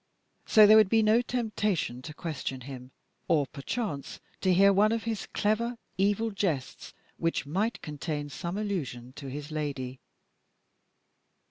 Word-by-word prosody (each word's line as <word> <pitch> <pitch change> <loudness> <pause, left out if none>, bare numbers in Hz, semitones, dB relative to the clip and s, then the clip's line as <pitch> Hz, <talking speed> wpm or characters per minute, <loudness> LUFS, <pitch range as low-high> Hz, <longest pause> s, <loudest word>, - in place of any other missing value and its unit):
So 215 -1 +8
there 215 +1 +8
would 215 -3 +6
be 225 0 +4
no 215 +3 +5
temptation 215 - -1
to 150 +4 -8
question 145 -6 -4
him, 130 -1 -9 0.4
or 155 -5 +3
perchance 145 - -4 0.2
to 190 - +2
hear 195 +2 +6
one 210 +3 +4
of 230 -1 -1
his 225 -2 -3
clever, 230 +3 0 0.2
evil 205 +3 +1
jests 175 -10 -3 0.2
which 165 -3 -1
might 200 +9 -1
contain 150 0 -4
some 170 +6 -4
allusion 140 - -3
to 140 - -7
his 145 +3 -6
lady. 140 -4 -4
180 Hz, 140 wpm, -29 LUFS, 140-215 Hz, 0.4 s, So